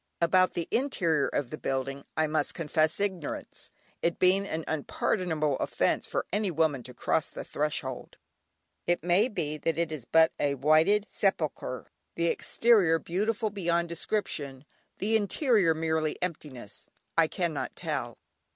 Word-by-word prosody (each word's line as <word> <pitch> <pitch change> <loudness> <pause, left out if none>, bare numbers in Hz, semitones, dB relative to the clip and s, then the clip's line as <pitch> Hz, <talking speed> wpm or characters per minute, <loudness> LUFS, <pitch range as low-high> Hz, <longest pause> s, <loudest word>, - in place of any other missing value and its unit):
About 185 +2 +3
the 170 - -3
interior 170 - +1
of 135 -4 -2
the 155 - -6
building 135 +1 -3
I 155 - +3
must 155 -1 -1
confess 155 -1 +1
ignorance, 190 -6 -4 0.3
it 170 - 0
being 190 +2 +3
an 160 -3 -3
unpardonable 155 -1 -1
offence - - 0
for - - -2
any 205 -1 +1
woman 160 -5 +1
to 125 +1 -9
cross 155 - 0
the - - -7
threshold. 145 -4 -3 0.7
It 175 0 +1
may 180 +6 +3
be 155 - -3
that 165 +2 -1
it 170 -1 0
is 145 -7 -5
but 160 +4 +5
a 140 -1 +1
whited 155 +9 +4
sepulchre, 155 - -2 0.2
the 170 0 +1
exterior 200 -8 +3
beautiful 210 +6 -1
beyond 170 -3 0
description, 150 -7 -2 0.3
the 215 +3 +1
interior 210 - +3
merely 160 -1 -1
emptiness: 150 - -6 0.3
I - - +5
cannot - - -3
tell. - - -3
165 Hz, 140 wpm, -28 LUFS, 150-190 Hz, 0.7 s, but